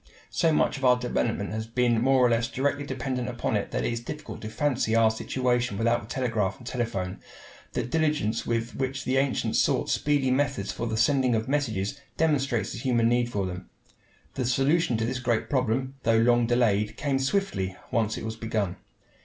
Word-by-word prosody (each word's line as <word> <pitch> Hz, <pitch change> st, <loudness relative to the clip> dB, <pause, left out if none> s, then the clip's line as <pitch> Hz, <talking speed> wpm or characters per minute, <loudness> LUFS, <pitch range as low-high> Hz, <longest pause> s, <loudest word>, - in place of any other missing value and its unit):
So 165 Hz, -2 st, +2 dB
much 150 Hz, -, +2 dB
of -, -, -10 dB
our 125 Hz, -1 st, +6 dB
development 120 Hz, -4 st, -1 dB
has 110 Hz, +1 st, -4 dB
been 120 Hz, -1 st, +2 dB
more 130 Hz, 0 st, +4 dB
or -, -, +4 dB
less 115 Hz, +1 st, +2 dB
directly 145 Hz, +3 st, -1 dB
dependent 130 Hz, -2 st, -3 dB
upon 120 Hz, -2 st, -2 dB
it 105 Hz, -, -1 dB
that -, -, -2 dB
it -, -, 0 dB
is 115 Hz, -, -2 dB
difficult 150 Hz, +6 st, -7 dB
to 110 Hz, -, -5 dB
fancy 115 Hz, -1 st, 0 dB
our 115 Hz, -1 st, +5 dB
situation 120 Hz, -1 st, -1 dB
without 115 Hz, +2 st, +2 dB
the 100 Hz, -, -12 dB
telegraph 110 Hz, -6 st, -1 dB
and 120 Hz, -, -14 dB
telephone. 115 Hz, -7 st, -3 dB, 0.5 s
The -, -, -1 dB
diligence 150 Hz, -5 st, 0 dB
with 115 Hz, 0 st, -2 dB
which 135 Hz, 0 st, -2 dB
the 130 Hz, +1 st, +1 dB
ancients 135 Hz, -1 st, +1 dB
sought -, -, +1 dB
speedy 140 Hz, -3 st, +1 dB
methods 135 Hz, -6 st, 0 dB
for 120 Hz, -, -4 dB
the 110 Hz, -1 st, -2 dB
sending 125 Hz, +1 st, +3 dB
of 110 Hz, +2 st, -1 dB
messages 135 Hz, -3 st, -1 dB, 0.2 s
demonstrates 140 Hz, -7 st, +1 dB
the -, -, -6 dB
human 120 Hz, -2 st, +2 dB
need 120 Hz, 0 st, +1 dB
for 100 Hz, -3 st, -1 dB
them. 90 Hz, 0 st, -6 dB, 0.6 s
The 130 Hz, -, -2 dB
solution 135 Hz, 0 st, +2 dB
of 110 Hz, -, 0 dB
this 125 Hz, +2 st, -2 dB
great 120 Hz, -3 st, -1 dB
problem, 130 Hz, 0 st, 0 dB
though 115 Hz, -2 st, +3 dB
long 120 Hz, +1 st, +4 dB
delayed, 110 Hz, -4 st, +1 dB
came 140 Hz, -3 st, 0 dB
swiftly, 135 Hz, -, -1 dB, 0.2 s
once 110 Hz, -2 st, 0 dB
it -, -, -5 dB
was 110 Hz, 0 st, -4 dB
begun. 110 Hz, -5 st, -2 dB
120 Hz, 195 wpm, -27 LUFS, 110-135 Hz, 0.6 s, our